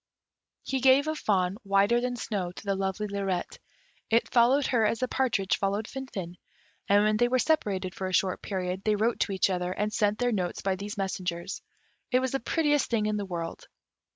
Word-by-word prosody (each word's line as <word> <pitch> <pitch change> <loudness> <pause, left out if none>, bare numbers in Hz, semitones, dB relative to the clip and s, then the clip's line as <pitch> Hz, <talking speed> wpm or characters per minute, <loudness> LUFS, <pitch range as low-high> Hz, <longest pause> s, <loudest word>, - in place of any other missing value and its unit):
He 265 - -1
gave 265 +3 +5
a 310 - 0
fawn 195 -9 0
whiter 200 +4 +3
than 250 0 -1
snow 200 -6 -3
to 185 - -11
the 200 - +1
lovely 195 +2 -2
Lirette; 195 -3 -3 0.5
it 230 +1 +2
followed 255 +4 +4
her 235 -3 +2
as 215 +1 +2
the 255 - -1
partridge 230 -8 0
followed 200 +2 0
Finfin; 195 -10 -6 0.5
and 205 +1 +5
when 215 0 +2
they 240 +2 +3
were 255 +1 +2
separated 200 - 0
for 190 - -4
a - - -4
short 185 0 +1
period, 185 -1 -3
they 215 -1 +2
wrote 220 +3 0
to - - 0
each 190 0 +2
other, 180 -1 -1
and 210 +3 -2
sent 210 -1 +1
their 245 0 +1
notes 180 -5 -2
by 195 -1 +1
these 205 +2 -6
messengers. 180 -3 -3 0.5
It 255 - +3
was 260 0 0
the 270 - 0
prettiest 295 +2 +1
thing 225 -3 +1
in 215 0 0
the 200 -1 -4
world. 170 -2 -5
205 Hz, 205 wpm, -28 LUFS, 190-240 Hz, 0.5 s, gave